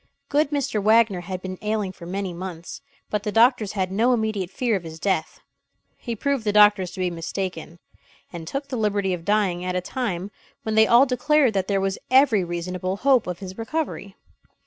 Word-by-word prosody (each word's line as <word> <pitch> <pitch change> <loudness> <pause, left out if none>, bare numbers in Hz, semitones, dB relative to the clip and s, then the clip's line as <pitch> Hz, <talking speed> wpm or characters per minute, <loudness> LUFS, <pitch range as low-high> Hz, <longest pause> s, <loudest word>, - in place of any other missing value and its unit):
Good 290 0 +2
Mr. 280 -7 -1
Wagner 215 -3 +3
had 185 +1 -6
been 185 -1 -6
ailing 210 -2 -1
for 170 -2 -12
many 190 0 -3
months; 175 -1 -7 0.3
but 210 - 0
the 210 0 -3
doctors 225 -2 +3
had 190 -3 -1
no 230 +6 +3
immediate 215 -5 -1
fear 235 +2 0
of 190 - -2
his 160 -1 -9
death. 185 -3 -1 0.6
He 235 -2 -5
proved 275 +2 -1
the 210 - +1
doctors 205 -3 +5
to - - -9
be 180 -1 0
mistaken; 170 0 -5 0.6
and 165 -2 -7
took 275 - -4
the 255 - -3
liberty 205 -3 0
of 170 -2 -6
dying 200 -4 +1
at 180 0 -2
a - - +2
time 195 -3 -3 0.3
when 220 - -2
they 220 0 +5
all 240 +3 +6
declared 265 0 +2
that 190 -1 -1
there 200 -1 +1
was 195 0 -2
every 255 -7 +5
reasonable 180 +2 -3
hope 260 -2 +3
of 180 -1 -3
his 190 +2 -9
recovery. 225 -6 -4
200 Hz, 195 wpm, -23 LUFS, 185-230 Hz, 0.6 s, all